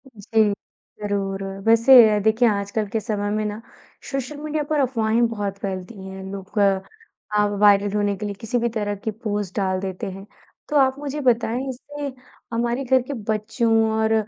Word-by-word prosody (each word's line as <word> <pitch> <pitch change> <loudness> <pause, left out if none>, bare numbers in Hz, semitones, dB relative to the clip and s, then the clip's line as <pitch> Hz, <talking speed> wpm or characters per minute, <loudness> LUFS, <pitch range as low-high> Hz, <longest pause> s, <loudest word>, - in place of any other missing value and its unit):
जी, 215 +1 +2 0.5
ज़रूर। 195 -1 -2 0.2
वैसे, 230 -2 +7
देखिए 220 +3 +4
आजकल 205 +1 -1
के 220 - -1
समय 205 -1 -2
में 215 +1 0
ना, 210 +1 -4 0.5
सोशल 275 +2 -3
मीडिया 305 0 -2
पर 305 -1 +1
अफ़वाहें 235 -3 +2
बहुत 205 -3 -4
फैलती 190 +2 -5
हैं। 190 0 -8
लोग 200 +1 -5
अ, 210 - -1
वायरल 205 -1 +5
होने 205 -1 +1
के 210 - -5
लिए 205 - -3
किसी 225 +2 -1
भी 235 0 +1
तरह 210 -2 -2
की 210 +2 -4
पोस्ट 210 -3 -4
डाल 190 -2 0
देते 190 -1 -4
हैं। 195 +1 -9 0.4
तो 300 - -2
आप 265 -1 +4
मुझे 290 0 -4
बताएँ, 245 0 +1
इससे 285 +2 -6 0.4
हमारे 240 +3 0
घर 260 0 +3
के 255 +4 -6 0.2
बच्चों 225 +2 0 0.2
और 220 0 +2
220 Hz, 170 wpm, -23 LUFS, 205-245 Hz, 0.5 s, वैसे